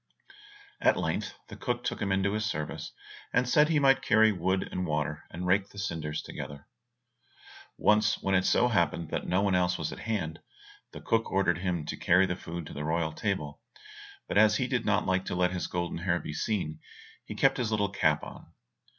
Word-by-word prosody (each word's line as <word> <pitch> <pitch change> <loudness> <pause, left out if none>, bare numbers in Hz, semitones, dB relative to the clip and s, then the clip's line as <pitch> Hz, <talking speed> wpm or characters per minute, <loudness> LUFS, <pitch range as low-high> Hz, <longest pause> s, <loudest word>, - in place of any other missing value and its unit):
At - - +4
length - - -2
the - - -9
cook 120 -1 -3
took - - -3
him 100 - 0
into 95 +1 +1
his 110 0 -1
service, 80 -6 -4 0.4
and 125 0 +2
said 150 +4 +4
he 160 - +3
might 135 -2 +4
carry 110 -3 +5
wood 95 0 0
and 90 -1 -2
water, 75 -2 -2
and 90 +2 -6
rake 95 +2 +2
the - - -16
cinders 80 -6 -3
together. 70 0 -8 1.1
Once 105 0 +3
when 95 - -1
it 95 -1 +4
so 125 - +3
happened 85 -6 0
that - - -3
no 95 +2 +2
one 100 -2 +2
else 90 -1 +2
was 80 - -3
at - - -8
hand, 90 -8 -3 0.5
the - - -9
cook 115 0 0
ordered 95 -3 +2
him 90 -4 -2
to - - -5
carry 90 +2 +4
the 90 - -2
food 85 -2 -7
to - - -9
the 75 - -5
royal 80 +1 0
table, 80 -7 -3 0.7
but - - +2
as 110 0 +5
he 130 - 0
did 125 -3 -1
not 105 0 +2
like 95 0 +1
to - - -3
let 90 0 +2
his 90 -1 -3
golden 85 -1 -3
hair 85 0 +1
be 75 - -6
seen, 80 -2 -2 0.4
he - - -8
kept 135 0 +3
his 120 -4 -1
little 105 -2 +1
cap 75 -6 +1
on. - - -10
95 Hz, 205 wpm, -29 LUFS, 85-110 Hz, 1.1 s, carry